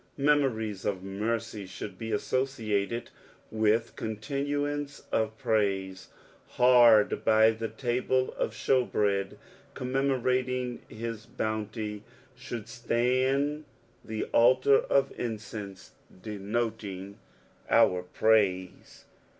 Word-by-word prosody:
Heroories 130 -9 +1
of 95 -2 -2
mercy 105 +1 -3
should 95 0 -8
be 115 0 -4
associated 115 -1 -1 0.4
with 110 +1 +1
contiousoce 145 +5 -3
<rf 110 0 0
praise. 95 -4 -1 0.5
Hard 120 -4 +6
by 110 0 +5
the 115 0 -4
tnble 130 +1 0
of - - -2
shew 130 -2 +2
bread 100 -4 -1 0.4
commemorating 125 -1 -1
his 115 0 -6
boonty, 110 -1 -3 0.3
should 115 -3 -6
atand 130 +5 0 0.4
the 110 -1 -3
altar 130 +3 +5
of 140 -1 +1
incense 105 -4 -6 0.3
denoting 105 -2 -4 0.5
our 90 0 +4
praise. 95 -1 0
110 Hz, 90 wpm, -28 LUFS, 105-125 Hz, 0.5 s, Hard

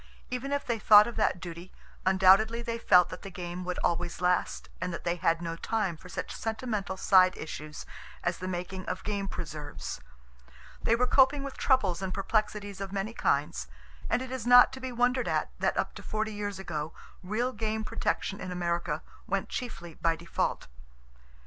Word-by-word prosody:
Even 250 +2 -3
if 285 0 -1
they 235 -2 -1
thought 210 0 +8
of 235 - -5
that 215 -4 +1
duty, 170 +1 -8 0.4
undoubtedly 195 +5 +5
they 230 0 -3
felt 180 -5 +6
that - - -8
the 195 - -7
game 180 -1 -6
would 180 0 -3
always 175 0 -1
last, 180 0 0
and 180 0 -1
that 170 - -6
they 170 0 0
had 165 0 +1
no 165 -1 -3
time 200 0 -1
for 180 +3 -14
such - - -5
sentimental 220 -4 -3
side 185 -1 +5
issues 155 -1 -7 0.4
as 175 0 -1
the 185 - -4
making 185 +1 -4
of 185 - -3
game 200 -2 -2
preserves. 150 - -6 0.8
They 230 - +3
were 250 +2 +2
coping 270 +2 +4
with 275 -1 -6
troubles 195 -10 +2
and 190 -1 -2
perplexities 205 0 -1
of 195 -1 -4
many 200 +3 -3
kinds, - - 0 0.4
and 250 - +1
it 260 - -8
is 255 -3 -4
not 245 0 +8
to 265 - -7
be 260 -1 -5
wondered 245 +1 +1
at - - 0
that - - +1
up - - -1
to - - -9
forty 220 0 -2
years 205 -1 -4
ago, 160 -4 -4 0.3
real 225 +7 -1
game 220 -1 -2
protection 195 -1 -2
in 185 - -5
America 175 -1 -1 0.2
went - - -1
chiefly 200 -9 -5
by 165 +1 +1
default. 170 +1 -2
195 Hz, 185 wpm, -29 LUFS, 175-230 Hz, 0.8 s, thought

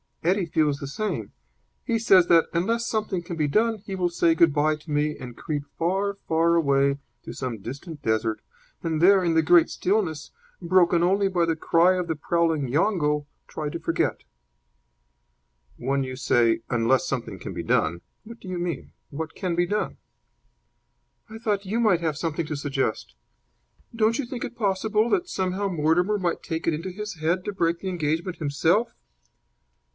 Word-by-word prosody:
Eddie 185 +3 +2
feels 150 -3 +1
the 140 - -5
same. 150 - -3 0.5
He 230 - 0
says 190 -6 +5
that, 165 -1 +5
unless 230 +7 0
something 215 -5 -1
can 170 0 -6
be 155 -2 0
done, 220 +7 +1
he 195 - -4
will 180 -2 0
say 170 -1 +2
good 165 -2 +4
bye 155 +1 +2
to 155 +1 -16
me 150 +1 +1
and 125 -2 -9
creep 150 -2 -3
far, 195 +4 0
far 165 +1 +3
away 140 -3 +2 0.3
to - - -7
some 125 -4 -4
distant 140 - -8
desert, 110 0 0 0.4
and 160 -2 -1
there, 190 +1 +6
in 170 -2 +1
the 160 - +4
great 170 +1 +5
stillness, 180 -6 -1 0.3
broken 175 -1 +3
only 195 +3 +3
by 180 -3 +1
the 165 -1 0
cry 170 +3 +3
of 180 -1 -2
the 160 - -1
prowling 160 -2 0
yongo, 150 - +1 0.2
try 150 -1 -4
to 170 - -5
forget." 165 0 -1 1.5
"When 135 +2 0
you 130 0 -5
say 115 -3 +2
'unless 120 +7 +2
something 130 -4 -4
can - - -7
be - - -5
done,' 85 +2 +1 0.2
what 230 +1 -11
do - - -12
you 180 -1 -3
mean? 175 -1 -4 0.2
What 160 +2 -6
can 180 -3 -2
be 175 +1 +2
done?" 210 +4 -2 1.3
"I 220 +1 -9
thought 205 -3 -1
you 215 +5 -1
might 205 -7 +3
have 160 -3 -1
something 165 +1 -2
to 155 - -3
suggest. 135 - -2 0.8
Don't 225 +1 +2
you 280 - -1
think 240 0 -6
it 240 - -6
possible 215 +1 +1
that 360 -2 +1
somehow 190 +1 -1
Mortimer 175 +4 +1
might 175 -2 -1
take 160 0 -4
it 165 - +3
into 165 +5 -5
his 210 +2 -6
head 170 +3 0
to 205 - -3
break 170 -3 0
the 190 - -4
engagement 170 +1 -2
himself?" 160 +9 +1
170 Hz, 180 wpm, -25 LUFS, 150-190 Hz, 1.5 s, there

